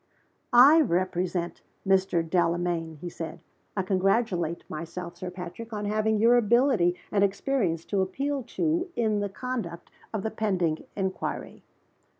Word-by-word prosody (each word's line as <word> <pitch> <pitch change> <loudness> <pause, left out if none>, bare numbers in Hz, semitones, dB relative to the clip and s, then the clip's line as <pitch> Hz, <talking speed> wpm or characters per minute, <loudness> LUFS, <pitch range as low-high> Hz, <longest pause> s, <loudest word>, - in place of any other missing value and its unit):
"I 280 +7 +8
represent 180 - -1 0.3
Mr. 190 -3 +2
Delamayn," 170 -1 0
he 180 - -5
said. 165 -1 -6 0.4
"I 195 - +1
congratulate 185 -3 +1
myself, 170 +2 -6
Sir 180 +1 -5
Patrick, 180 +6 -8
on 210 -1 -3
having 215 +1 +1
your 235 +3 +5
ability 235 -6 +3 0.2
and 200 -1 +3
experience 195 -4 0
to 200 -2 0
appeal 275 +9 -1 0.2
to 340 +2 +1
in 215 -3 +1
the 205 0 -1
conduct 195 -6 -5 0.2
of 215 -3 -3
the 220 - -2
pending 185 -8 0
inquiry." 190 -2 -3
190 Hz, 135 wpm, -27 LUFS, 175-225 Hz, 0.4 s, I